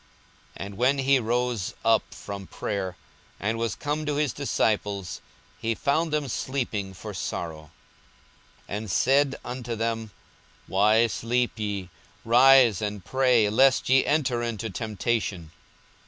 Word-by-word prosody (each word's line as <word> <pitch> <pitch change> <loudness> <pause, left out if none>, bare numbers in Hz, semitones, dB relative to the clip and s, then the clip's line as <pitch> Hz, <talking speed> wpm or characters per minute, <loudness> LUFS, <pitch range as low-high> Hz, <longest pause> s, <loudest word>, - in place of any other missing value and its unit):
42:022:045 - - -5
And 100 0 -9
when 130 +4 +3
he 135 0 +3
rose 120 -3 -1
up 115 -1 +2
from 100 -2 -7
prayer, 95 -3 -4 0.4
and 110 +3 -1
was 115 -2 -1
come 150 +1 -2
to 150 - 0
his 145 -4 0
disciples, 100 -8 -1 0.4
he 115 0 -1
found 155 +5 0
them 150 -2 0
sleeping 115 -7 -3
for 85 - -8
sorrow, 80 -2 -5 1.0
42:022:046 - - -4
And 110 -1 -7
said 135 - +3
unto 120 -1 -4
them, 115 0 -2 0.6
Why 105 +4 +4
sleep 120 +2 0
ye? 100 -4 -3 0.4
rise 125 -2 +6
and 105 -3 -4
pray, 125 -5 +3
lest 130 +3 +4
ye 130 0 +5
enter 135 -5 +1
into 115 -2 -3
temptation. 105 -5 -2
115 Hz, 135 wpm, -26 LUFS, 100-130 Hz, 1.0 s, rise